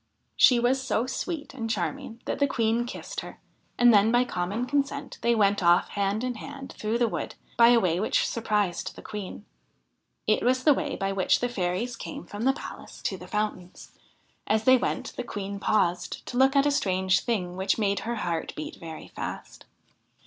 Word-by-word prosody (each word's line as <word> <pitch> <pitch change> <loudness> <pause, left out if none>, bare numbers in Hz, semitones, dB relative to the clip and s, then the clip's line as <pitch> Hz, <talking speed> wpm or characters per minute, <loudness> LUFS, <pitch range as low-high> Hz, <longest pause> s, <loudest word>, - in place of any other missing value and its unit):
She 250 -2 +6
was 255 +3 +2
so 250 -3 0
sweet 300 +3 -4
and 230 -4 -4
charming 210 +3 -3
that - - -2
the 285 - +4
Queen 230 -2 +1
kissed - - -6
her, - - -9 0.4
and 240 -1 +6
then 210 +2 +5
by 245 +1 +4
common 200 +3 -2
consent 280 +2 -2
they 235 0 +3
went 205 -2 +3
off 175 0 +4
hand 200 +2 -1
in 255 -1 -1
hand 275 +4 -8
through 220 +2 -1
the 240 -1 +2
wood - - -4 0.2
by 235 - +7
a 240 0 +6
way 180 -4 +1
which 215 - +1
surprised 210 -6 -1
the - - -11
Queen. 205 0 -7 0.8
It 215 - +2
was 255 +1 +2
the 300 - +7
way 285 0 -2
by 195 -1 -1
which 195 -1 +2
the 245 - 0
fairies 200 +2 -2
came 280 +4 -7
from 205 +3 -5
the 270 - +4
palace 295 - -9
to 195 - -1
the 180 0 -10
fountains. 210 -3 -4 0.6
As 215 +1 +2
they 260 +3 +7
went 250 - -2
the - - -2
Queen 200 -3 -5
paused 180 -4 0
to - - -7
look 265 +2 +4
at 275 0 +5
a 290 - +3
strange 190 -8 +2
thing 185 -7 -2
which 190 +1 0
made 200 -3 +1
her 235 +2 -3
heart 170 -6 -2
beat 155 - -6
very 160 -1 -9
fast. - - -7
220 Hz, 195 wpm, -27 LUFS, 195-245 Hz, 0.8 s, by